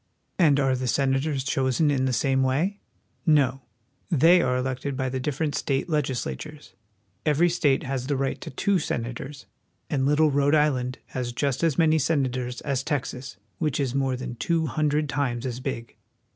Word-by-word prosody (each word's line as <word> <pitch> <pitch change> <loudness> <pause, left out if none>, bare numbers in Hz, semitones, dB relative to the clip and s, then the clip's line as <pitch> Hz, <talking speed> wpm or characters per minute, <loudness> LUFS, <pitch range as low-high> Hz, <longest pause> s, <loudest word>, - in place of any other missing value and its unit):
And 150 -5 +5
are 135 -2 +2
the 130 0 -3
senators 135 +3 +1
chosen 135 +1 +1
in 130 -2 +1
the 130 - +1
same 135 +2 +1
way? 155 +10 0 0.4
No; 135 -4 +3 0.5
they 170 +2 +5
are 125 -4 +1
elected 130 +1 -3
by 130 -1 -1
the 130 +1 -3
difTerent 150 +3 -2
state 135 +3 -1
legislatures. 150 +1 -3 0.5
Every 155 +3 +3
state 150 -5 +2
has 130 -1 -3
the 140 -1 0
right 135 0 -2
to - - -6
two 190 +8 +1
senators, 130 +1 -4 0.5
and 135 -3 +1
little 150 +1 +4
Rhode 140 +2 +3
Island 130 -4 +1
has 125 -2 -3
just 140 +3 -1
as 165 -4 +2
many 160 -1 +4
senators 130 -5 -1
as 140 -3 -1
Texas, 135 - -4 0.2
which 150 -3 0
is 135 -3 0
more 135 -1 0
than 125 -1 -5
two 165 +2 0
hundred 150 0 0
times 135 -4 -1
as 125 -1 -3
big. 125 -3 -5
135 Hz, 170 wpm, -25 LUFS, 130-150 Hz, 0.5 s, And